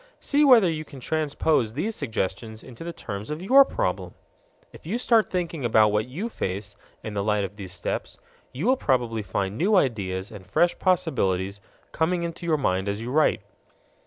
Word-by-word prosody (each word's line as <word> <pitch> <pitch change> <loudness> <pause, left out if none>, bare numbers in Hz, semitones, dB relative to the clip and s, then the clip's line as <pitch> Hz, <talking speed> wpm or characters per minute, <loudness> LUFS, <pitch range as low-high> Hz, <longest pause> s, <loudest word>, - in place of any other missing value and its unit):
See 290 +1 +2
whether 245 -9 +7
you 155 -2 -2
can 140 -3 -12
transpose 150 -4 0
these 210 +10 -2
suggestions 110 -3 -3
into 130 +4 -10
the 170 - -4
terms 105 -9 -7
of 150 +3 -4
your 270 +8 +8
problem. - - -3 0.6
If - - -13
you 215 +7 -1
start 230 -3 +3
thinking 170 -5 -3
about 110 -2 +4
what 105 +2 0
you 170 - -4
face, 100 - -4 0.3
in 110 - -5
the 100 - -1
light 105 0 +1
of 100 +1 -5
these 95 -3 -8
steps, 90 0 -4 0.3
you 135 +9 -4
will 260 +2 +4
probably 120 - 0
find 100 +1 -3
new 205 +5 +3
ideas 100 - 0
and 105 -3 -10
fresh 170 - +1
possibilities 100 - 0 0.3
coming 170 +2 0
into 170 0 -5
your 160 -2 +3
mind 95 -7 0
as 100 +1 -2
you 120 +2 -5
write. 150 -7 +3
125 Hz, 185 wpm, -25 LUFS, 105-170 Hz, 0.6 s, your